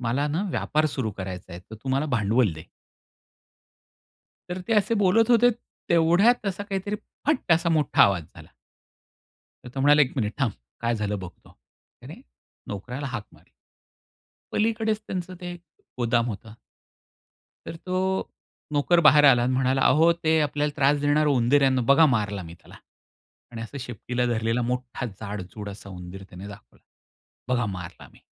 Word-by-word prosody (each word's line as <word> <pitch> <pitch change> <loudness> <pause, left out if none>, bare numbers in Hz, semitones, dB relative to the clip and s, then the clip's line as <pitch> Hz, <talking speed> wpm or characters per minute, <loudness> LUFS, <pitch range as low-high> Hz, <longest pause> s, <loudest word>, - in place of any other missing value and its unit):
मला 125 +4 0
ना 160 +6 -1
व्यापार 155 -2 0
सुरु 130 -6 -3
करायचा 95 -1 -7
आहे, 85 - -8
तर 100 +4 -12
तू 110 +5 -9
मला 135 +3 +1
भांडवल 115 - +2
दे. 80 +2 -11 1.8
तर 180 - -4
ते - - +2
असे 210 +2 +2
बोलत 215 +3 +3
होते, 240 +1 +6 0.4
तेवढ्यात 175 +8 +4
असा 195 0 -2
काहीतरी 200 +1 -3 0.3
फट 280 - +2
असा 170 +1 +2
मोठा 155 -4 +3
आवाज 95 -4 +3
झाला. - - -13 1.2
तर - - -8
तो 135 - -3
म्हणाला, 145 +2 +6
"1 130 - 0
मिनिट 110 -4 -1
थांब, 130 -7 +1 0.3
काय 115 0 0
झालं 105 -2 -2
बघतो." 90 -2 -12 0.4
त्याने - - -11 0.5
नोकऱ्याला 125 +8 -5
हाक 115 -5 -4
मारली. - - -22 1.0
पलीकडेच 220 0 0
त्यांचं 185 0 -5
ते 175 -1 -6 0.4
गोदाम 120 -1 +1
होतं. 110 0 -7 1.1
तर - - -6
तो 185 - -2 0.8
नोकर 150 +4 +3
बाहेर 150 -2 +6
आला 125 -3 +6
आणि 125 - +1
म्हणाला, 130 +1 +1
"अहो, 160 +5 +5
ते 160 -1 +1
आपल्याला 150 0 0
त्रास 145 0 +3
देणार 145 +1 +2
उंदीर 140 0 +3
आहे 135 - +4
ना, 130 - +1
बघा 160 +3 +7
मारला 105 -3 -3
मी 85 0 -10
त्याला." - - -16 0.8
आणि 115 - -7
असं 140 +5 -7
शेपटीला 125 0 -3
धरलेला 115 0 0
मोठा 125 0 -3
जाडजूड 105 -1 -7
असा 100 0 -11
उंदीर 90 +1 -9
त्याने 90 +2 -10
दाखवला. 100 -12 -15 0.7
"बघा 120 -3 +1
मारला 85 -2 -10
मी." - - -20
130 Hz, 155 wpm, -25 LUFS, 110-165 Hz, 1.8 s, बघा